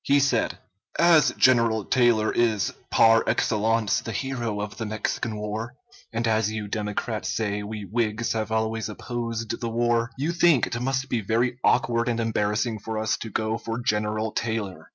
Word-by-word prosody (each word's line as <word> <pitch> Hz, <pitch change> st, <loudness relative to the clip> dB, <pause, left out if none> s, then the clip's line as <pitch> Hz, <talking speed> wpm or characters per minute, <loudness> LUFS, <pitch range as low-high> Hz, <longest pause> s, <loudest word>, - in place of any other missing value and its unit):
He 140 Hz, +1 st, +4 dB
said: 140 Hz, 0 st, +1 dB, 0.4 s
As 170 Hz, -3 st, +5 dB
General 115 Hz, -4 st, +4 dB
Taylor 120 Hz, -4 st, +3 dB
is 110 Hz, -4 st, +1 dB, 0.2 s
par 115 Hz, 0 st, +5 dB
excellence 110 Hz, -1 st, +1 dB
the 115 Hz, -, -6 dB
hero 120 Hz, -5 st, -3 dB
of 105 Hz, 0 st, -5 dB
the 110 Hz, -, -3 dB
Mexican 110 Hz, +1 st, -3 dB
war, 110 Hz, +3 st, -4 dB, 0.4 s
and 115 Hz, 0 st, -1 dB
as 110 Hz, -1 st, +1 dB
you 110 Hz, -1 st, -4 dB
Democrats 105 Hz, +2 st, -3 dB
say 105 Hz, -2 st, -1 dB
we 105 Hz, 0 st, -6 dB
Whigs 110 Hz, +2 st, -1 dB
have 110 Hz, -1 st, -3 dB
always 110 Hz, 0 st, -1 dB
opposed 115 Hz, 0 st, -4 dB
the 115 Hz, -, -2 dB
war, 115 Hz, 0 st, +1 dB
you 145 Hz, +5 st, -1 dB
think 170 Hz, -6 st, +4 dB
it 120 Hz, -, -4 dB
must 135 Hz, +1 st, -1 dB
be 120 Hz, -3 st, -1 dB
very 120 Hz, +4 st, 0 dB
awkward 115 Hz, +1 st, +2 dB
and 120 Hz, -1 st, -1 dB
embarrassing 110 Hz, 0 st, 0 dB
for 110 Hz, +2 st, -5 dB
us 110 Hz, 0 st, 0 dB
to 115 Hz, -, -7 dB
go 110 Hz, +2 st, -1 dB
for 115 Hz, +1 st, -4 dB
General 110 Hz, -1 st, -1 dB
Taylor. 110 Hz, -5 st, -3 dB
115 Hz, 170 wpm, -25 LUFS, 110-120 Hz, 0.4 s, As